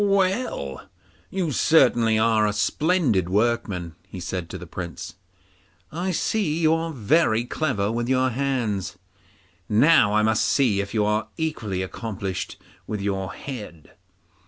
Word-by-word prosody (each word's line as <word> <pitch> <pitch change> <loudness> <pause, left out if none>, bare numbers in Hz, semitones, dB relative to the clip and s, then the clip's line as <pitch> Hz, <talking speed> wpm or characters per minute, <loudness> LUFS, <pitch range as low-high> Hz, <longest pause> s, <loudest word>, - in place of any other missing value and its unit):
'Well, 195 - 0 0.4
you 185 -5 -1
certainly 120 -7 +4
are 110 -1 +3
a 105 - 0
splendid 120 - +1
workman,' 100 -5 0
he 95 - -8
said 90 -1 -4
to - - -6
the - - -9
Prince. 85 -3 -7 0.8
'I 175 +4 -2
see 180 -2 0
you 160 -1 +4
are 165 0 -1
very 120 -2 +2
clever 115 -8 -1
with 120 +1 -2
your 130 0 +2
hands, 115 -7 -2 0.7
now 110 -2 +5
I 110 - +4
must 110 0 +2
see 115 -8 +2
if 100 +3 -6
you 105 -1 +2
are 105 +1 0
equally 110 - -2
accomplished 95 -1 -5 0.3
with 105 - -3
your 95 -1 -2
head. 105 - -8
110 Hz, 135 wpm, -24 LUFS, 100-150 Hz, 0.8 s, now